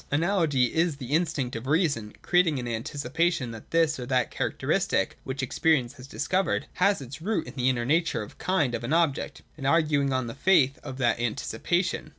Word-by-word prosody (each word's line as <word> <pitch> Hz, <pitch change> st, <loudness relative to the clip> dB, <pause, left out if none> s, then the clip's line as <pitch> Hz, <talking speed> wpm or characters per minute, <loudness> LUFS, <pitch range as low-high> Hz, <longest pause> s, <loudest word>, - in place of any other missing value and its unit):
Analogy 150 Hz, -, +2 dB
is 165 Hz, -1 st, +1 dB
the 135 Hz, 0 st, -5 dB
in 170 Hz, +3 st, +4 dB
stinct 140 Hz, -6 st, -3 dB
of 115 Hz, +3 st, -5 dB
reason, 140 Hz, -, 0 dB
creating 175 Hz, -4 st, +3 dB
an 125 Hz, -1 st, -4 dB
anticipation 130 Hz, +4 st, -1 dB
that 110 Hz, -2 st, -11 dB
this 165 Hz, -3 st, +2 dB
or 125 Hz, -, -5 dB
that 130 Hz, -1 st, +1 dB
characteristic, -, -, -1 dB
which 130 Hz, 0 st, -4 dB
experience 130 Hz, -1 st, +1 dB
has 130 Hz, -2 st, -12 dB
discovered, 185 Hz, +8 st, 0 dB
has 200 Hz, -3 st, +2 dB
its 135 Hz, +4 st, -9 dB
root 195 Hz, -1 st, -1 dB
in -, -, -9 dB
the 130 Hz, -1 st, +1 dB
inner 120 Hz, -2 st, 0 dB
nature 155 Hz, -5 st, +1 dB
or 105 Hz, -, -9 dB
kind 160 Hz, -10 st, +1 dB
of -, -, -3 dB
an 120 Hz, -, -1 dB
object, 165 Hz, -5 st, 0 dB
and 135 Hz, -3 st, -3 dB
arguing 150 Hz, -3 st, +2 dB
on 130 Hz, -1 st, 0 dB
the 115 Hz, -, -6 dB
faith 140 Hz, -4 st, +3 dB
of 130 Hz, -, -7 dB
that 120 Hz, -3 st, +1 dB
anticipation. 120 Hz, -, -1 dB
140 Hz, 190 wpm, -27 LUFS, 125-165 Hz, -, in